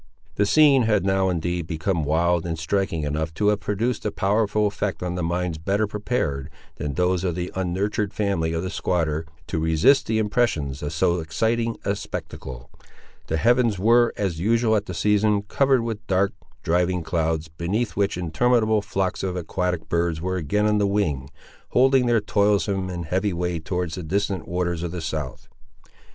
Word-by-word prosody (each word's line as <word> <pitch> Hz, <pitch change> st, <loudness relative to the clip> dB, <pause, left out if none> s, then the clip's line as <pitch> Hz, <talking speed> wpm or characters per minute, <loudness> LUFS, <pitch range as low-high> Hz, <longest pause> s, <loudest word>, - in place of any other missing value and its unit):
The 100 Hz, -, +1 dB
scene 145 Hz, 0 st, +6 dB
had 105 Hz, -4 st, +2 dB
now, 95 Hz, -1 st, +2 dB
indeed, 85 Hz, -1 st, -2 dB
become 80 Hz, 0 st, -1 dB
wild 85 Hz, +3 st, +2 dB
and 85 Hz, -2 st, -3 dB
striking 85 Hz, 0 st, -1 dB
enough 75 Hz, +2 st, -2 dB
to 105 Hz, +2 st, +2 dB
have 105 Hz, -1 st, +1 dB
produced 105 Hz, +4 st, -1 dB
a 105 Hz, -, -1 dB
powerful 105 Hz, +1 st, +1 dB
effect 105 Hz, -2 st, -2 dB
on 90 Hz, -1 st, -2 dB
minds 85 Hz, -1 st, -2 dB
better 100 Hz, +5 st, +1 dB
prepared, 105 Hz, -, -2 dB, 0.3 s
than 70 Hz, -2 st, -4 dB
those 90 Hz, +2 st, +1 dB
of 90 Hz, -3 st, -1 dB
the 90 Hz, 0 st, -3 dB
unnurtured 95 Hz, +3 st, -1 dB
family 100 Hz, -6 st, 0 dB
of 80 Hz, +1 st, -2 dB
the 95 Hz, -, -3 dB
squatter, 80 Hz, -5 st, -1 dB, 0.2 s
to -, -, -2 dB
resist 80 Hz, -, +3 dB
the 110 Hz, -, +1 dB
impressions 105 Hz, -, 0 dB
of 75 Hz, -, -3 dB
so 85 Hz, 0 st, +1 dB
exciting 115 Hz, +8 st, -1 dB
a 100 Hz, +1 st, +1 dB
spectacle. 65 Hz, -9 st, -7 dB, 0.6 s
The 80 Hz, -, -1 dB
heavens 120 Hz, +1 st, +3 dB
were, 115 Hz, +5 st, +4 dB
as 95 Hz, -6 st, -2 dB
usual 115 Hz, +3 st, +2 dB
at 105 Hz, -1 st, -1 dB
the 90 Hz, -, -5 dB
season, 105 Hz, +1 st, +2 dB
covered 130 Hz, +3 st, +2 dB
with 115 Hz, -2 st, -5 dB
dark, 95 Hz, +1 st, +2 dB, 0.3 s
driving 90 Hz, +1 st, +1 dB
clouds, 80 Hz, -1 st, -1 dB
beneath 90 Hz, +9 st, -2 dB
which 100 Hz, -2 st, 0 dB
interminable 110 Hz, +5 st, +2 dB
flocks 95 Hz, -1 st, -2 dB
of 95 Hz, -2 st, -2 dB
aquatic 90 Hz, 0 st, -2 dB
birds 85 Hz, -2 st, 0 dB
were 95 Hz, +3 st, -2 dB
again 90 Hz, +6 st, 0 dB
on 105 Hz, 0 st, +2 dB
the 100 Hz, -, +2 dB
wing, 75 Hz, -10 st, -1 dB, 0.4 s
holding 130 Hz, 0 st, +4 dB
their 115 Hz, -2 st, +3 dB
toilsome 100 Hz, -2 st, +1 dB
and 85 Hz, -2 st, -5 dB
heavy 95 Hz, +4 st, 0 dB
way 90 Hz, 0 st, -2 dB
towards 90 Hz, 0 st, -3 dB
the 90 Hz, -, -4 dB
distant 95 Hz, +1 st, -2 dB
waters 85 Hz, -1 st, -1 dB
of 85 Hz, -, -2 dB
the 90 Hz, -, -4 dB
south. 75 Hz, -5 st, -5 dB
95 Hz, 175 wpm, -24 LUFS, 85-105 Hz, 0.6 s, scene